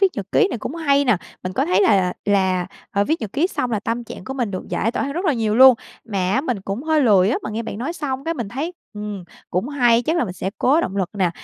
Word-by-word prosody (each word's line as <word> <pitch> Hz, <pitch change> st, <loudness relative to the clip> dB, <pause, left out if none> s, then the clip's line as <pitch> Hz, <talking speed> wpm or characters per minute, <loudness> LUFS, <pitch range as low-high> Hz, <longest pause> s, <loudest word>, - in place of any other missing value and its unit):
viết 390 Hz, -, +6 dB
nhật -, -, -4 dB
ký 420 Hz, -4 st, +4 dB
này 240 Hz, -, -4 dB
cũng 275 Hz, -, -5 dB
hay 285 Hz, -4 st, +2 dB
nè. 245 Hz, -6 st, +3 dB, 0.3 s
Mình 185 Hz, -, -4 dB
có -, -, +1 dB
thấy 185 Hz, +3 st, +3 dB
là 205 Hz, -, +5 dB
là 180 Hz, -1 st, +1 dB
là, 190 Hz, -3 st, +2 dB, 0.2 s
à, 200 Hz, -3 st, +1 dB
viết 315 Hz, +4 st, 0 dB
nhật 215 Hz, -3 st, -5 dB
ký 305 Hz, +6 st, +2 dB
xong 250 Hz, -9 st, -2 dB
là 215 Hz, -, 0 dB
tâm 230 Hz, +3 st, -3 dB
trạng 185 Hz, -, -9 dB
của 265 Hz, -, -5 dB
mình 245 Hz, -6 st, -1 dB
được 185 Hz, -, -6 dB
giải 225 Hz, -, 0 dB
tỏa -, -, -1 dB
hơn 280 Hz, -, -2 dB
rất 355 Hz, +5 st, -3 dB
là 310 Hz, -, +3 dB
nhiều 220 Hz, -3 st, 0 dB
luôn. 260 Hz, 0 st, +9 dB, 0.3 s
Mà 205 Hz, -4 st, -3 dB, 0.2 s
á 265 Hz, -, +3 dB
mình 250 Hz, -9 st, -2 dB
cũng 195 Hz, +7 st, -4 dB
hơi 315 Hz, -1 st, +2 dB
lười 205 Hz, -6 st, +5 dB
á, -, -, +1 dB
mà -, -, -4 dB
nghe 225 Hz, +2 st, -3 dB
bạn 210 Hz, -, -6 dB
nói 265 Hz, +8 st, -3 dB
xong 275 Hz, -5 st, -4 dB
cái 330 Hz, 0 st, -1 dB
mình 235 Hz, -8 st, -4 dB
thấy, 295 Hz, -, -4 dB, 0.2 s
ừm, 210 Hz, -3 st, -6 dB, 0.3 s
cũng 185 Hz, +8 st, -1 dB
hay, 245 Hz, -5 st, +3 dB
chắc 320 Hz, +7 st, 0 dB
là 340 Hz, -, +2 dB
mình 185 Hz, -, -5 dB
sẽ 190 Hz, +1 st, -4 dB
cố 285 Hz, +6 st, +4 dB
động 195 Hz, -, -3 dB
lực 190 Hz, -3 st, -1 dB
nè. 185 Hz, -4 st, +1 dB
235 Hz, 300 wpm, -21 LUFS, 200-280 Hz, 0.3 s, luôn